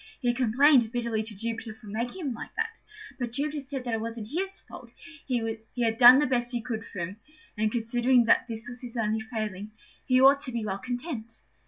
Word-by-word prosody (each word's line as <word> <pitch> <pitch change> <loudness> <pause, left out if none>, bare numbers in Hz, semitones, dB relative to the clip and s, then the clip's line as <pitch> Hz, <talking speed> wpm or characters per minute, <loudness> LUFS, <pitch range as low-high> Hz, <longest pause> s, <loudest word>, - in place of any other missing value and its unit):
He 245 -3 +1
complained 250 0 +4
bitterly 235 -3 -1
to 220 -1 -6
Jupiter 225 +1 -4
for 225 0 -17
making 235 - -4
him 265 - -1
like 230 - -9
that; 450 0 -3 0.4
but 240 -2 -3
Jupiter 295 +3 -1
said 270 -2 -6
it 225 -2 -1
wasn't 225 -1 -5
his 385 +4 -2
fault: - - -12 0.4
he 230 -3 -1 0.2
had 230 -2 0
done 245 +1 +10
the 295 - +3
best 245 -2 0
he 240 - -1
could 225 -1 -4
for 200 - -7
him, 185 +5 -5 0.4
and, 215 0 0
considering 240 +2 +3
this 225 0 +1
was 245 0 -8
his 245 -1 -7
only 220 -1 0
failing, 215 -2 -5 0.3
he 255 -1 +4
ought 275 +2 +7
to 260 - -3
be 235 -2 -3
well 195 -1 -3
content. 245 - -5
235 Hz, 200 wpm, -27 LUFS, 220-255 Hz, 0.4 s, done